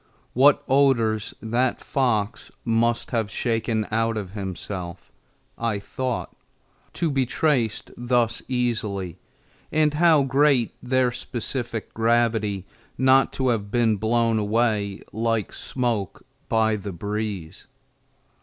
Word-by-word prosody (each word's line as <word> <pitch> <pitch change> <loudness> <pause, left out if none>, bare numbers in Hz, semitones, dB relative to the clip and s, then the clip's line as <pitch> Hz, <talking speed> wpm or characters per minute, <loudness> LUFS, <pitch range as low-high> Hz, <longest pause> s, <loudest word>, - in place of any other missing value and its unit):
What 140 +3 +5
odors 120 -6 +2
that 120 +3 +1
fox 115 -6 -1 0.2
must 115 0 +1
have 115 -4 0
shaken 115 -1 -1
out 115 0 +1
of 95 -4 -5
himself, 95 -2 -6 0.5
I 115 -3 0
thought, 125 +4 -4 0.6
to 165 -3 0
be 135 -2 +1
traced 125 -6 0
thus 120 -1 +1
easily, 110 -8 -2 0.5
and 155 -1 +3
how 155 -2 +5
great 135 -2 +3
their 125 0 +2
specific 120 -1 -4
gravity 115 -4 +1 0.3
not 130 +1 +4
to 130 -1 0
have 105 -4 -1
been 115 -1 +2
blown 115 +1 +2
away 105 -2 0
like 115 -1 -1
smoke 120 -7 -3 0.2
by 110 -1 +2
the 100 0 -6
breeze! 100 -2 -5
115 Hz, 110 wpm, -24 LUFS, 105-125 Hz, 0.6 s, What